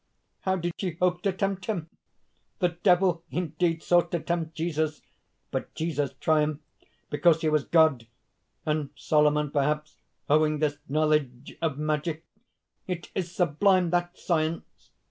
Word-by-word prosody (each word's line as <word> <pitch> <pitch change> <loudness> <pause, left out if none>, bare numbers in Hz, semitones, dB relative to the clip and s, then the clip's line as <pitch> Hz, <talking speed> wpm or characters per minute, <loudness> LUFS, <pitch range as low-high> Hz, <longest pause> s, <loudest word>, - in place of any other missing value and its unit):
'_ - - -50 0.4
"How 190 0 0
did 175 -1 -2
she 185 -3 -1
hope 180 +1 0
to 195 - +1
tempt 195 0 -2
him? 180 -8 -2 0.7
The 180 -5 +2
Devil 175 0 +2
indeed 165 -1 -1
sought 175 -1 +3
to 170 - -1
tempt 165 -1 -3
Jesus! 155 -2 -2 0.5
But - - -4
Jesus 155 -4 -1
triumphed 155 -1 +1 0.5
because 160 +2 +4
he 155 - +2
was 155 -2 +1
God; 155 -8 +3 0.6
and 150 -2 0
Solomon, 150 -1 +2
perhaps, 150 +1 -1 0.3
owing 155 +1 +3
this 145 -1 -1
knowledge 150 -4 0
of 155 -4 0
magic! 155 +2 -2 0.6
It 180 -2 -5
is 180 -3 -2
sublime 180 +1 +2
that 175 0 0
science! 160 -1 -2
160 Hz, 140 wpm, -27 LUFS, 150-175 Hz, 0.7 s, because